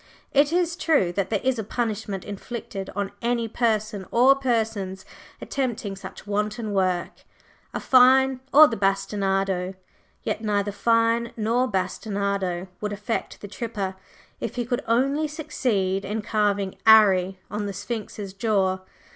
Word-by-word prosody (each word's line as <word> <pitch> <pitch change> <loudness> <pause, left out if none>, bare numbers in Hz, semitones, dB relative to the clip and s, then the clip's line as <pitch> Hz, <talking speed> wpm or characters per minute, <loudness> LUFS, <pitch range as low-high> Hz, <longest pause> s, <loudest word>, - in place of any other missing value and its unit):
It 285 +1 +4
is 345 -1 +1
true 305 - +2
that 195 0 -1
there 210 -3 0
is 260 -2 +1
a - - -2
punishment 215 -3 -3
inflicted 205 -1 -6
on 200 0 -2
any 235 -1 0
person 215 -4 -1
or 255 +3 +6
persons 220 -7 -1 0.3
attempting 235 -7 -3
such 195 - -10
wanton 210 +1 -2
work 185 -3 0 0.5
a - - -3
fine 260 0 +5
or 305 +2 +9
the 230 - -3
bastinado; 195 -1 0 0.5
yet 220 - -2
neither 205 -1 0
fine 230 +2 +2
nor 230 +4 +1
bastinado 195 -2 -2
would 210 -1 -2
affect 210 +3 -4
the 205 - -7
"tripper" 200 -2 -4 0.4
if - - -4
he 240 -1 -2
could 245 +2 -1
only 275 +6 +2
succeed 245 - -1
in 210 +2 -3
carving 205 -3 0
"'Arry" 195 -4 +6
on 205 0 -2
the - - -3
Sphinx's 205 -2 -5
jaw. 195 -2 +1
210 Hz, 140 wpm, -24 LUFS, 195-240 Hz, 0.5 s, or